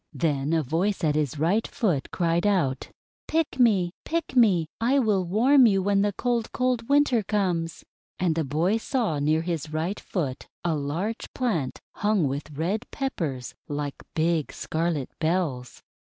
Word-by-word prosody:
Then 140 0 0
a 165 -1 +2
voice 180 +8 -1
at 155 -2 +3
his 150 -2 -1
right 180 +9 +1
foot 175 - -1
cried 170 +2 +1
out: 145 -10 0 0.4
'Pick 315 -4 0
me! 200 -8 +4
Pick 330 -3 -3
me! 200 -9 +5
I 245 +5 +2
will 210 -7 +2
warm 245 +8 +5
you 195 -3 +2
when 200 0 +2
the 205 0 +2
cold, 235 +1 -1
cold 250 -2 -1
Winter 280 -5 +4
comes!' 180 -5 -1 0.3
And 180 -3 +1
the 165 0 0
boy 160 +9 +1
saw 225 - -1
near 155 +3 +2
his 165 -3 -3
right 165 +6 -2
foot 145 -9 -4 0.2
a 170 -2 +1
large 160 +10 -3
plant 205 - -1 0.2
hung 205 -7 +2
with 140 +3 -4
Red 200 +9 -2
Peppers 155 - -3 0.2
like 145 -1 -3 0.2
big 160 -2 +1
scarlet 160 -4 -2
bells. 155 -7 -1
175 Hz, 155 wpm, -26 LUFS, 155-220 Hz, 0.4 s, me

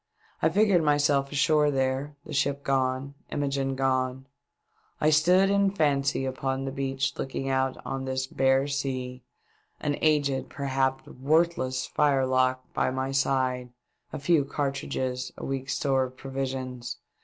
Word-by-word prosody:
I 160 - +4
figured 195 0 +4
myself 145 -2 +2
ashore 150 +1 +3
there 135 +1 -1
— - - -41
the 155 - -8
ship 140 0 0
gone 130 0 0
— - - -33
Imogene 140 -2 -1
gone! 130 0 0 0.7
I 155 - +3
stood 180 +6 +4
in 200 0 +3
fancy 140 -7 +1
upon 130 0 -2
the 135 - -3
beach 135 0 -1
looking 135 0 -3
out 130 0 0
on 135 0 -3
this 130 0 -1
bare 135 +1 +2
sea; 130 -3 -3 0.6
an 145 -1 -1
aged, 145 -4 +2
perhaps 135 -1 -1
worthless 135 -2 0
firelock 130 -3 +2
by - - +1
my 130 +1 -2
side, 130 -2 0 0.4
a - - -4
few 150 +1 +3
cartridges, 135 -2 -3
a - - -6
week's 135 0 -3
store 135 -2 +1
of 130 0 -11
provisions 130 -2 -4
135 Hz, 145 wpm, -27 LUFS, 130-145 Hz, 0.7 s, I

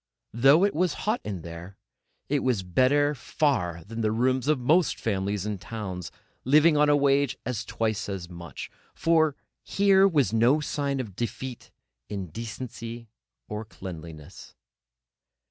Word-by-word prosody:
Though 135 - +5
it 200 - +3
was 175 +1 +1
hot 215 +3 +1
in 95 -6 -5
there, 85 +4 -9 0.5
it 145 +1 +1
was 125 -7 0
better 130 +10 +3
far 90 - -1
than 115 +4 -6
the 110 -1 +1
rooms 130 +3 +1
of 155 -3 +3
most 155 +8 +2
families 100 -2 -1
in 105 -2 -3
towns, 95 -3 -6 0.3
living 150 +4 +5
on 150 0 +4
a 145 - +5
wage 140 -1 +2
of 120 -2 -2
twice 110 -3 -2
as 95 -3 -4
much; 85 -1 -9 0.2
for 160 -3 +3 0.3
here 195 -1 +4
was 140 - +2
no 120 +7 +4
sign 140 -2 -2
of 110 -7 -5
defeat 120 +2 -5 0.4
in 100 -4 -4
decency 115 +2 -7 0.4
or 105 +1 -4
cleanliness. 85 -7 -10
120 Hz, 145 wpm, -27 LUFS, 100-145 Hz, 0.5 s, Though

